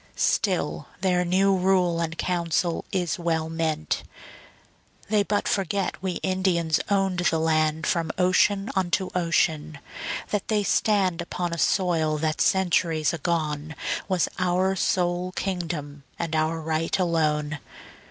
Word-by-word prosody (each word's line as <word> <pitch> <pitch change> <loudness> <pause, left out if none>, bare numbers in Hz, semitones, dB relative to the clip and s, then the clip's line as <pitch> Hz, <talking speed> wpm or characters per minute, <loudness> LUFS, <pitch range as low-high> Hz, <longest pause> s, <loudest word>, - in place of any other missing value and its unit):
Still 175 -7 0
their 180 -2 +2
new 190 +2 +3
rule 180 -2 +2
and 165 0 -3
council 170 -1 0
is 180 -2 -1
well 160 -2 -1
meant. 160 -1 -1 1.1
They 215 -1 +3
but 205 0 0
forget 195 -1 -1
we 185 -1 -1
Indians 185 -4 +1
owned 195 -3 +1
the 175 -2 +2
land 155 -1 +1
From 165 -2 0
ocean 195 +3 +2
unto 185 0 0
ocean; 160 -3 0 0.5
that 205 -2 -1
they 210 -2 +1
stand 195 -4 +2
Upon 175 0 -3
a 170 - -3
soil 165 -6 +2
that 155 0 -1
centuries 170 -4 +2
agone 155 -1 -2 0.3
Was 185 -3 +1
our 185 +1 +1
sole 180 -1 0
kingdom 165 -7 -4 0.2
and 165 -2 -2
our 160 +1 +1
right 160 +1 -1
alone. 155 -4 0
175 Hz, 125 wpm, -25 LUFS, 160-185 Hz, 1.1 s, new